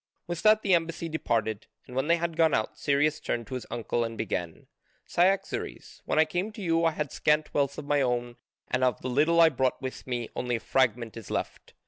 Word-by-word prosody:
With 175 -1 -4
that 215 0 +5
the 195 - +3
embassy 165 0 0
departed. 115 -8 -1 0.2
And 125 - -11
when 135 +2 0
they 170 - +5
had 170 -1 -2
gone 160 -2 +4
out 110 - -1
Cyrus 145 +2 +1
turned 120 -1 -3
to 120 - -9
his 125 - -5
uncle 120 0 -1
and 115 -1 -5
began, 90 -6 -4 0.4
"Cyaxares, 190 +3 -1
when - - -1
I 155 - +6
came 180 +7 -2
to 215 - -9
you 165 -1 +2
I 165 - +4
had 150 -3 -3
scant 150 0 +1
wealth 140 -1 0
of 150 - -6
my 145 0 +2
own 120 -2 -1 0.3
and 130 - 0
of 125 -3 +1
the 130 - -2
little 155 +6 +3
I 165 -1 +8
brought 130 -3 0
with 130 -1 -6
me 120 -2 -2
only 125 -1 -1
a - - -2
fragment 120 -3 0
is 115 - -9
left. - - -4
140 Hz, 220 wpm, -28 LUFS, 120-165 Hz, 0.4 s, I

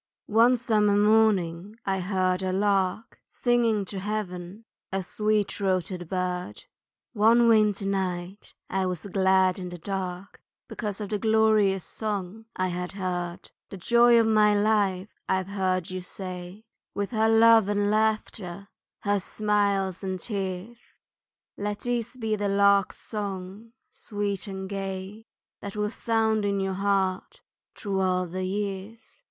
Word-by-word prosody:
One 235 +3 +6
summer 210 -4 +2
morning 205 -3 +2
I 195 -1 0
heard 185 0 0
a 190 -1 -1
lark 195 +2 0
Singing 235 -4 +1
to 195 +1 -5
heaven, 195 0 -5 0.3
a 190 0 -1
sweet 210 +2 0
throated 185 -3 -2
bird, 180 -1 -3 0.5
One 230 +2 +5
winter 210 -3 +3
night 190 0 -3
I 190 0 -1
was 180 -1 -4
glad 190 -1 +2
in 180 -1 -5
the 175 - -7
dark, 185 +1 -5 0.3
Because 210 -2 -5
of 205 - -4
the 210 - -1
glorious 215 -4 +3
song 210 0 -5
I 185 0 0
had 180 +1 -4
heard. 180 -2 -4 0.2
"The 195 - -8
joy 235 +5 +5
of 225 - +4
my 210 -2 +4
life," 205 -2 +1 0.2
I've 190 0 0
heard 185 -3 -1
you 185 0 -4
say, 180 +2 -8 0.3
"With 200 +2 -2
her 220 -1 +2
love 225 -2 +6
and 205 0 +1
laughter, 215 -3 -1 0.3
her 205 0 +1
smiles 200 -2 0
and 190 -1 -3
tears" 200 +3 -5 0.6
Let 205 0 -3
these 245 0 -2
be 220 -3 -1
the 205 -1 -1
lark's 200 -1 +3
song, 205 +1 -6 0.2
sweet 205 -2 -4
and 190 -1 -5
gay, 195 +2 -6 0.3
That 200 0 -7
will 210 0 -1
sound 220 -2 +1
in 200 -1 0
your 195 0 -1
heart 195 - -1 0.3
through 200 -2 -2
all 185 -1 +1
the 185 +2 -4
years. 205 +3 -5
200 Hz, 140 wpm, -26 LUFS, 185-215 Hz, 0.6 s, One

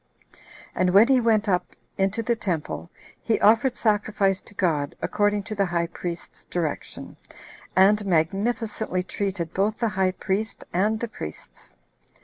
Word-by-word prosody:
And 185 +1 +1
when 220 +5 +7
he 260 -2 +5
went 220 -2 +2
up 180 -2 0 0.2
into 195 +4 0
the 235 +1 +1
temple, 175 -6 -3 0.3
he 225 - +1
offered 230 +4 +4
sacrifice 205 -3 +1
to 205 - -14
God, 155 -7 0
according 205 -1 +1
to 215 - -6
the 200 -2 +1
high 170 -1 0
priest's 170 0 -6
direction, 165 -4 -4 0.6
and 200 +3 +5
magnificently 195 +3 0
treated 185 -3 -3
both 205 +3 0
the 230 - 0
high 190 -2 +1
priest 200 +3 -2
and 210 +5 +1
the 235 - -2
priests. 75 - -9
200 Hz, 140 wpm, -25 LUFS, 180-220 Hz, 0.6 s, when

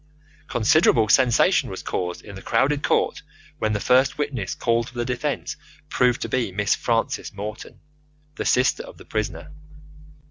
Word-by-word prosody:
Considerable 115 -1 +3
sensation 125 0 +4
was - - -7
caused 90 -1 -3
in 100 - -10
the 95 - -9
crowded 140 +8 +1
court - - +1 0.4
when 110 -1 0
the 105 - -1
first 130 +7 +3
witness 140 -10 -3
called 115 0 0
for 125 - -14
the 120 - -1
defence 125 0 -3 0.3
proved 125 -1 +2
to - - -3
be 125 -6 -1
Miss 105 +1 +1
Frances 115 -1 -1
Morton, 105 +2 -8 0.5
the - - -5
sister 125 +1 +2
of - - -12
the - - -14
prisoner. 100 -7 -4
115 Hz, 155 wpm, -23 LUFS, 105-125 Hz, 0.5 s, sensation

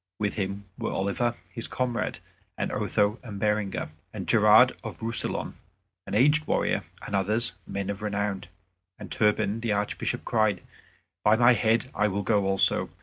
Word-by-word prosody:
With 105 -1 -1
him 100 0 -3
were - - -2
Oliver, 115 +5 0 0.2
his 115 +5 -5
comrade, 125 -2 -2 0.4
and - - -2
Otho 105 +2 +1
and 105 -6 -8
Berenger, 105 -6 -1 0.2
and - - -6
Gerard - - +6
of - - -7
Roussillon, 115 0 -2 0.5
an - - -3
aged 145 +7 +4
warrior, - - +1 0.2
and 100 - -3
others, 105 +2 +1
men 100 0 -3
of 100 0 -7
renown. 105 -2 -2 0.5
And - - -10
Turpin 105 0 +1
the 115 -2 0
Archbishop 105 0 -2
cried, 110 -5 +1 0.6
"By 105 - +5
my 120 +2 +6
head, 115 +2 +1
I 105 - +2
will 100 0 -2
go 100 -1 +2
also." 95 0 +2
105 Hz, 155 wpm, -27 LUFS, 100-115 Hz, 0.6 s, Gerard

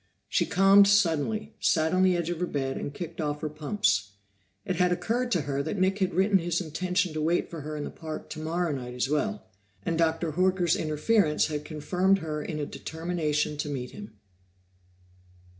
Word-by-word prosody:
She - - +1
calmed 195 +1 +6
suddenly, 200 +3 +2
sat 160 +1 +2
on 185 - +3
the 185 -1 +4
edge 170 0 -2
of 170 - -4
her 180 - 0
bed 135 -3 -2
and - - -4
kicked 165 +2 -6
off 150 -1 -2
her 155 - -2
pumps. 125 - 0 0.5
It 180 - -2
had 180 0 +3
occurred 240 +7 0
to 175 - +2
her 140 0 -2
that 140 - -3
Nick 190 +2 +1
had 185 -3 0
written 195 +1 +4
his 170 0 -1
intention 180 +1 -1
to 155 - -2
wait 165 +3 0
for 165 -2 -6
her 150 +1 -5
in 145 - -3
the - - -5
park 155 -2 -7
tomorrow 165 +2 -2
night 125 -3 -5
as 125 +1 -1
well, 210 +8 -1 0.4
and 165 -1 -1
Dr. 165 0 +1
Horker's 180 0 +2
interference 155 +2 +2
had 150 -1 -3
confirmed 180 +5 +1
her 155 -4 -4
in 155 - -4
a 150 - -2
determination 155 -2 -2
to 150 0 -3
meet 125 -3 -4
him. 205 0 -10
165 Hz, 190 wpm, -27 LUFS, 150-185 Hz, 0.5 s, calmed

